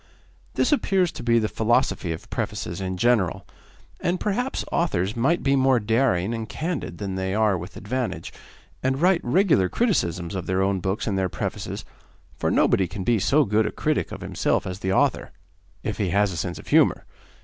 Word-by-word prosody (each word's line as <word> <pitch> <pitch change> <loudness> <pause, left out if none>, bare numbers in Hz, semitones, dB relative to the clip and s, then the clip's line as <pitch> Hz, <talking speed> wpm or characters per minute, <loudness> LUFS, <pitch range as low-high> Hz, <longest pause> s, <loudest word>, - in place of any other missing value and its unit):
This - - +2
appears 190 - +2
to - - -8
be 120 -1 +3
the 110 -2 +2
philosophy 110 -5 +1
of 80 - -6
prefaces 85 +2 -3
in 95 -1 -3
general, 95 -4 +1 0.5
and 175 +1 -1
perhaps 245 +6 -1
authors 100 - 0
might 135 +9 +1
be 135 - +3
more 130 -2 +4
daring 110 -3 +1
and 110 -2 -4
candid 155 - -4
than 100 0 -4
they 95 +1 -2
are 110 -2 +3
with 90 +2 -7
advantage, 125 +3 -3 0.5
and 130 +1 0
write 180 +1 +3
regular 125 - +3
criticisms 90 - 0
of 95 -3 -4
their 95 +1 +1
own 95 0 +1
books 95 +3 -2
in 100 -3 -1
their 95 -1 0
prefaces, - - -4 0.5
for - - -1
nobody 95 - +3
can 95 +2 -6
be 115 +2 +2
so 145 +9 +3
good 110 +1 +2
a - - -3
critic 155 -1 -1
of - - -7
himself - - 0
as 90 0 -5
the 95 -2 -1
author - - +1 0.5
if 110 - -3
he 100 -4 0
has 100 +2 +2
a - - -5
sense 85 +2 -3
of - - -11
humour. - - +4
105 Hz, 190 wpm, -24 LUFS, 95-135 Hz, 0.5 s, more